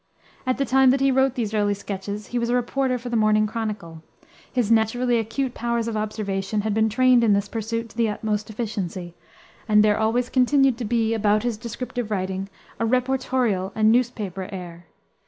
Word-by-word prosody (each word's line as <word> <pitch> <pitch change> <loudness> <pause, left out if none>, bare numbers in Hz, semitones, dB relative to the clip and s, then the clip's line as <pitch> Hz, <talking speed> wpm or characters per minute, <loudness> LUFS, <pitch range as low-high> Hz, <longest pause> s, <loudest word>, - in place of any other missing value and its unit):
At 255 - +1
the 275 - 0
time 265 +1 +4
that 270 +2 +3
he 275 0 +3
wrote 265 0 +2
these 225 -5 -2
early 205 -1 +1
sketches 200 +1 -5
he 245 - +1
was 235 0 -1
a 245 - +2
reporter 255 +1 0
for 245 0 -7
the 240 - -2
Morning 215 -1 +3
Chronicle. 210 -7 -5 0.5
His 240 -4 0
naturally 235 +2 +2
acute 230 +4 -2
powers 235 -1 -1
of 230 - -3
observation 210 -1 -2
had 215 0 -1
been 220 +1 +2
trained 250 +1 +4
in 215 -3 +4
this 200 0 +1
pursuit 230 +1 -3
to 220 - -18
the 230 -2 +2
utmost 210 0 -2
efficiency, 190 -6 -4 0.6
and 210 0 +6
there 210 0 +2
always 230 +3 +1
continued 265 -1 +3
to 240 - -3
be 230 0 +1
about 210 -1 +2
his 240 -2 -1
descriptive 235 +1 -5
writing 190 -1 -3 0.3
a - - 0
reportorial 250 -5 0
and 215 0 +4
newspaper 210 -6 -1
air. 175 -3 -8
220 Hz, 190 wpm, -23 LUFS, 205-245 Hz, 0.6 s, and